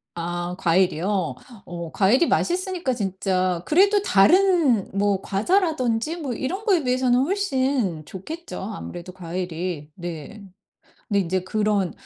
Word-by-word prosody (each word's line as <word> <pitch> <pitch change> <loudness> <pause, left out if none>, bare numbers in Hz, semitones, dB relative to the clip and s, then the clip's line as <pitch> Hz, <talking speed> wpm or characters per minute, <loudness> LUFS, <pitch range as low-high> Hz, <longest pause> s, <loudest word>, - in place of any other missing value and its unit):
아 175 +1 -3
과일이요? 180 -2 +1 0.3
어 170 -2 -7
과일이 215 - +3
맛있으니까 360 -5 0
진짜 185 -4 -1
그래도 400 +5 +4
다른 325 - +4
뭐 200 -1 +1
과자라든지 285 - 0
뭐 285 -7 -4
이런 370 - -4
거에 370 -7 +3
비해서는 250 -1 +2
훨씬 265 - 0
좋겠죠 315 - -7
아무래도 185 -3 -7
과일이. 175 -3 -4
네. 175 +3 -7 0.7
근데 200 -1 +2
인제 185 0 0
그런 205 -2 0
205 Hz, 275 characters per minute, -23 LUFS, 180-300 Hz, 0.7 s, 그래도